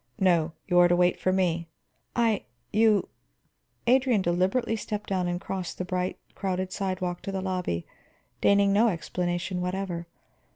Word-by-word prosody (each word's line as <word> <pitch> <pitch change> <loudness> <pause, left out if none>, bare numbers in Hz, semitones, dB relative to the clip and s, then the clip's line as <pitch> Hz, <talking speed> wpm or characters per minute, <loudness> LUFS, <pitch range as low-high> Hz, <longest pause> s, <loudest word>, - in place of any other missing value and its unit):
"No; 175 -5 +3
you 180 -1 +3
are 175 - +7
to 175 - +3
wait 180 0 +3
for 185 - +1
me." 175 -3 +1 0.5
"I 230 -4 +2 0.3
you 215 -1 +4 0.4
" - - -46
Adrian 255 -7 +2
deliberately 190 +7 +1
stepped 210 -1 -4
down 185 -2 0
and 175 0 -1
crossed 190 -2 -5
the 185 - -3
bright, 180 0 -2 0.2
crowded 185 -1 -2
sidewalk 185 -2 -2
into 195 - -5
the 195 - -2
lobby, 180 - -2 0.6
deigning 200 0 +4
no 220 +4 +5
explanation 175 -1 -2
whatever. 180 -2 -3
185 Hz, 155 wpm, -27 LUFS, 175-200 Hz, 0.6 s, are